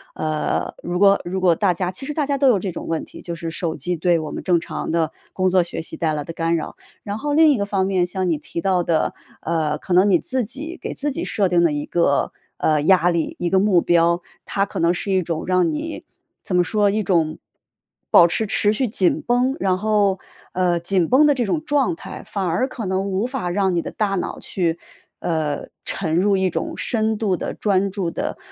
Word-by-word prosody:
呃， 155 -1 -2
如 175 +1 -2
果 200 0 +5
如 185 +2 -3
果 175 -3 +4
大 195 -4 +2
家 180 +1 -2
其 270 +9 -5
实 300 - -4
大 295 -1 0
家 280 0 0
都 275 0 +3
有 225 -6 +4
这 185 0 -3
种 170 - -7
问 165 -1 -2
题， - - -12
就 170 - -5
是 165 0 -5
手 165 -2 -2
机 175 +5 -2
对 170 0 +2
我 155 -1 -5
们 - - -6
正 175 -2 +3
常 165 - -5
的 165 -2 +1 0.2
工 185 -1 +1
作 185 -1 +3
学 170 - -5
习 - - -7
带 160 -2 0
来 150 -1 -2
的 165 - -7
干 165 0 0
扰。 155 - -4 0.3
然 205 0 -4
后 290 +4 -2
另 315 0 +6
一 275 - +2
个 200 - -1
方 195 -2 0
面， 185 -2 +1
像 185 0 -2
你 160 - +1
提 170 +3 -6
到 185 -2 +1
的， 165 -2 0 0.3
呃， 155 -2 -1
可 180 - -3
能 185 +3 +5
你 180 -3 +4
自 255 -3 -1
己 300 - -6
给 - - -4
自 290 0 -2
己 - - -3
设 195 -3 +1
定 175 -1 +3
了 170 - +3
一 145 0 -2
个， 170 -5 +1 0.3
呃， 155 -2 +2
压 175 +1 +4
力、 170 -2 -1
一 175 - 0
个 190 - +3
目 190 -3 +4
标， 170 0 +3 0.2
它 195 - 0
可 200 - -6
能 170 +1 +3
是 195 +2 -3
一 190 - +3
种 165 -1 -3
让 185 -2 +2
你 310 +1 -5 0.4
怎 180 - -2
么 180 - +4
说， 205 +3 +2
一 215 +2 0
种 165 -4 +1 0.7
保 170 - +8
持 195 +6 0
持 205 +1 +3
续 255 +4 0
紧 195 -4 +2
绷。 250 +2 +2
然 190 -1 +2
后， 205 -2 +2 0.3
呃， 175 -2 +1
紧 180 -1 +2
绷 280 +4 +5
的 290 - +4
这 250 -3 0
种 300 +9 -1
状 290 - +1
态， - - -9
反 205 -2 -2
而 175 +10 +1
可 230 -5 -6
能 190 +1 -1
无 195 +5 0
法 250 -9 -3
让 190 0 +1
你 170 - +1
的 - - -6
大 205 -2 -1
脑 180 - -3
去， 170 -3 -1 0.4
呃， 155 -3 -2 0.2
沉 165 -4 -1
入 200 +3 +3
一 190 0 +2
种 - - -3
深 220 -2 0
度 195 -5 +1
的 - - -4
专 200 -1 +1
注 185 -3 -2
的， - - -4
185 Hz, 255 characters per minute, -21 LUFS, 170-210 Hz, 0.7 s, 保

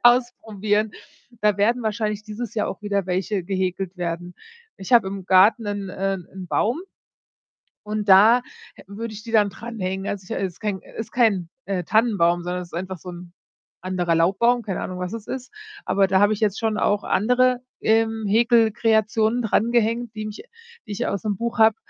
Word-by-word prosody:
ausprobieren.“ 220 -4 +2 0.5
Da 210 -2 +3
werden 230 +4 +2
wahrscheinlich 215 -1 -2
dieses 215 +1 -6
Jahr 210 - 0
auch 195 - -6
wieder 200 -2 -1
welche 185 +2 -1
gehäkelt 190 0 -2
werden. 175 0 -4 0.4
Ich 190 +5 -7
habe 230 -5 +6
im 195 -1 -7
Garten 200 +5 +5
'nen 205 -2 -3
äh, 195 +1 -1
'n 185 +1 -10
Baum 235 - 0 1.0
und 210 0 -3
da 210 +6 +7 0.3
hä - - -15
würde 215 +3 -6
ich 210 0 -9
die 230 - -8
dann 210 -3 +4
dranhängen. 195 -2 -5
Also, 190 -2 -4
ich - - -2
es 190 -2 -2
ist - - -24
kein 205 -3 -3
äh, - - -17
ist 225 -1 -5
kein, 205 -8 +2 0.2
äh, 195 -2 -2
Tannenbaum, 175 -5 +2
sondern 180 +1 -3
es 175 - -10
ist - - -26
einfach 185 +1 -5
so 180 - -9
'n 175 0 -10 0.5
anderer 180 -2 0
Laubbaum, 200 +9 +3
keine 195 -5 -4
Ahnung, 185 -1 -5
was 180 0 -4
es 225 -2 -7
ist. 255 -1 -6 0.3
Aber 195 0 +2
da 190 0 +3
habe 205 +1 +5
ich 210 - -5
jetzt 205 -3 +1
schon 220 -2 0
auch 205 -1 +1
andere, 250 +4 +2 0.2
ähm, 225 0 +2
Häkelkreationen 225 0 +3
drangehängt, 230 +1 +1
die 215 0 -4
mich 210 - -8 0.4
die - - -9
ich 210 +4 -2
aus 200 - -3
'nem 210 -1 0
Buch 235 +4 -3
habe, 220 -1 +6
210 Hz, 190 wpm, -23 LUFS, 190-225 Hz, 1.0 s, da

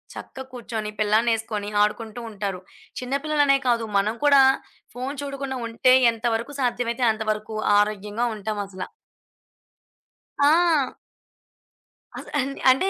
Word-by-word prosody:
చక్కగా 265 0 -9
కూర్చొని, 225 -3 -5
పిల్లాడినేసుకొని, 215 -1 +1
ఆడుకుంటూ 220 +2 -3
ఉంటారు. 195 -3 -4 0.4
చిన్న 250 +1 -5
పిల్లలనే 290 -2 +3
కాదు. 235 -2 +2
మనం 210 +3 +1
కూడా 280 -1 +7 0.5
ఫోను 260 +3 -4
చూడకుండా 275 -1 -4
ఉంటే, 230 +3 +3 0.2
ఎంతవరకు 230 +3 -2
సాధ్యమైతే 245 0 0
అంతవరకు 215 0 -3 0.2
ఆరోగ్యంగా 210 +2 -1
ఉంటామసల. 200 -2 -4 1.6
ఆ! 310 -1 +3 1.3
అస్ - - -10
అన్ 270 0 0 0.2
అంటే, 320 +9 +1
230 Hz, 100 wpm, -24 LUFS, 215-265 Hz, 1.6 s, కూడా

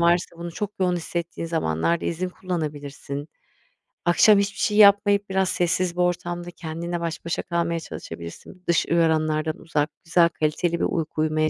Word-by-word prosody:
varsa 170 0 +2
bunu 170 0 -6
çok 205 +3 -3
yoğun 180 -1 +2
hissettiğin 170 0 -4
zamanlarda 165 - 0
izin 180 +2 -2
kullanabilirsin. 150 -5 -5 0.8
Akşam 200 +4 +6
hiçbir 200 0 -1
şey 210 - +1
yapmayıp 200 -1 +6
biraz 190 -1 +1
sessiz 175 0 0
bir 180 - 0
ortamda 175 0 -1
kendinle 170 +1 -5
baş 165 -1 -4
başa 170 - -1
kalmaya 170 -1 -1
çalışabilirsin. 85 - -9
Dış 170 - +3
uyaranlardan 155 -2 +1
uzak, 150 -2 -1
güzel, 170 0 +4
kaliteli 165 +2 -1
bir - - +2
uyku 155 -2 -2
uyumaya 155 0 +1
170 Hz, 150 wpm, -24 LUFS, 155-180 Hz, 0.8 s, Akşam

